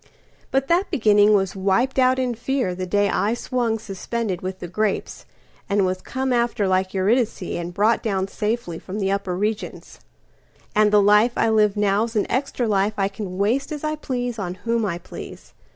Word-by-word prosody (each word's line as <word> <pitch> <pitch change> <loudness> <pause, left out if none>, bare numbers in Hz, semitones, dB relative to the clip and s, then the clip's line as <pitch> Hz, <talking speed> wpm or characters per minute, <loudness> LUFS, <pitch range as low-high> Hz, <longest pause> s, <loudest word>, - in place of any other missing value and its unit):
But 270 0 0
that 355 +4 +2
beginning 210 -2 +4
was 195 0 0
wiped 200 +8 +1
out 255 0 +4
in 255 -2 0
fearThe 215 -7 -2
day 205 +1 +2
I 210 +3 +1
swung 240 -2 -1
suspended 210 -2 -4
with 185 0 -4
the 180 - -7
grapes, 210 +3 -2 0.4
And 200 -1 +2
was 185 0 -2
come 260 +3 -2
after 235 -4 +1
like 185 0 +1
EurydiceAnd 190 -4 -1
brought 215 +3 +3
down 195 -3 -1
safely 210 -4 -3
from 195 +2 -7
the 195 -2 0
upper 195 -2 -2
regions; 210 +2 -4 0.7
And 210 0 +4
the 210 -1 +5
life 210 +4 +5
I - - +3
live 210 -2 +3
now's 210 +3 +1
an 210 - +2
extra 255 -1 -1
lifeI 200 -1 0
can 190 -3 -6
waste 230 +10 0
as 295 -1 -5
I 305 0 -1
please 245 -5 -3
on 180 -2 -3
whom 230 -2 +1
I 170 -3 -2
please. 175 - -10
210 Hz, 175 wpm, -22 LUFS, 195-235 Hz, 0.7 s, the